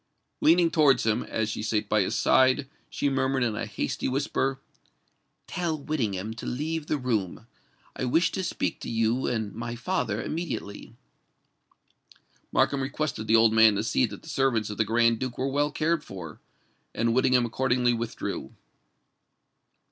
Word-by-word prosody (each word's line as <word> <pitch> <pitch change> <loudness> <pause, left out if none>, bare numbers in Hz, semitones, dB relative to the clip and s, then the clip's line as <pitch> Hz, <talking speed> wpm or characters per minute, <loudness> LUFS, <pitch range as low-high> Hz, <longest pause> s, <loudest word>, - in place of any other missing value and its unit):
Leaning 170 +1 +5
towards 150 -7 +4
him, 110 +1 +1
as 110 -1 -2
she 105 - -4
sate 110 -1 -1
by 105 0 +2
his 100 +4 -1
side, 130 +2 +3 0.2
she - - -1
murmured 135 -1 +1
in 115 -3 0
a 115 - -3
hasty 105 - -3
whisper, 135 0 -1 0.9
"Tell 170 -3 -2
Whittingham 110 -9 -2
to - - -6
leave 155 +4 -3
the 150 - 0
room: 115 -6 -2 0.5
I - - -2
wish 165 +8 +2
to 190 - -3
speak 180 - -2
to - - -5
you 115 +3 +1
and 110 -4 -2
my 120 +1 -5
father 125 - -2
immediately." 150 -11 -5 1.6
Markham 140 -1 +2
requested 135 -4 -3
the 110 - +4
old 115 -1 +5
man 110 -1 +6
to 100 - -1
see 120 +2 +2
that 105 -2 -10
the - - -14
servants 130 -8 0
of 105 - -7
the 110 - +3
Grand 115 +1 +2
Duke 130 -2 -4
were 130 - -1
well 145 +2 +1
cared 155 +1 0
for; 90 -5 -9 0.5
and 115 +1 +1
Whittingham 125 0 +3
accordingly 125 +1 +1
withdrew. 115 -1 -4
125 Hz, 160 wpm, -27 LUFS, 110-140 Hz, 1.6 s, man